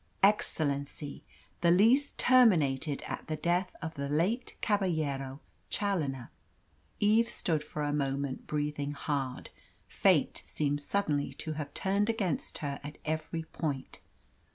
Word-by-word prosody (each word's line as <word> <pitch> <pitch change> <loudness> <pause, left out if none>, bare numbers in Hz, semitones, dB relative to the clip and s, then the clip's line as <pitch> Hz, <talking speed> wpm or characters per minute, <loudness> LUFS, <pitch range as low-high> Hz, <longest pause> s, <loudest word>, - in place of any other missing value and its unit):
"Excellency, 145 -7 +1 0.4
the 170 - +4
lease 230 +11 +5
terminated 160 - +4
at - - -5
the 155 - -1
death 175 +4 +1
of 160 0 -3
the 140 -1 -4
late 180 - 0
Caballero 155 - 0 0.3
Challoner." 145 - -1 0.7
Eve 220 +3 +4
stood 160 -5 0
for 150 0 -4
a 145 0 0
moment, 140 -2 -2
breathing 145 -1 -2
hard. 140 -3 -3 0.4
Fate - - +2
seemed 145 -1 -1
suddenly 150 -4 0
to 155 - -4
have 150 -2 -5
turned 200 +3 +1
against 200 - -1
her 140 -1 -3
at 145 +1 -7
every 160 +1 -2
point. 150 -4 -4
155 Hz, 125 wpm, -31 LUFS, 140-190 Hz, 0.7 s, lease